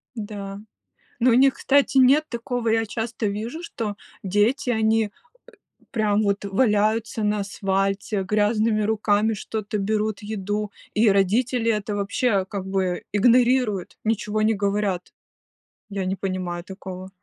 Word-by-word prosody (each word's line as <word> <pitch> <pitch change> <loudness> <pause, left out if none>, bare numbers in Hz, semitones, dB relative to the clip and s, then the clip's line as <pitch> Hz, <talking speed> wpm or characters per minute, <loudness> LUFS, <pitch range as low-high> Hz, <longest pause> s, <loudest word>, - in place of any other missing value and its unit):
Да, 205 -3 -6 0.6
но 250 +2 +5
у - - +4
них, 265 +2 +5
кстати, 280 -1 +2
нет 275 +4 +6
такого. 235 -1 -3
Я 225 0 +2
часто 225 +1 -3
вижу, 225 +11 -4
что 220 -10 -4 0.3
дети, 210 +8 +1
они, 220 -1 +2
э, - - -12 0.8
прям, 215 -3 +1
вот, 200 0 0
валяются 215 +1 +1
на 210 0 +1
асфальте, 195 0 -1
грязными 215 +2 +1
руками 215 0 +2
что-то 215 +1 -4
берут, 210 +1 -1
еду, 205 0 -3 0.2
и 215 +1 +4
родители 225 +5 +2
это 210 -1 -2
вообще, 200 0 0
как 195 -1 -5
бы, 190 -2 -1
игнорируют, 240 -2 +3
ничего 215 -1 -1
не 220 +1 +3
говорят. 200 -3 -1 0.8
Я 195 -2 -3
не 190 - -1
понимаю 185 -3 -3
такого. 185 0 -8
210 Hz, 130 wpm, -23 LUFS, 200-225 Hz, 0.8 s, нет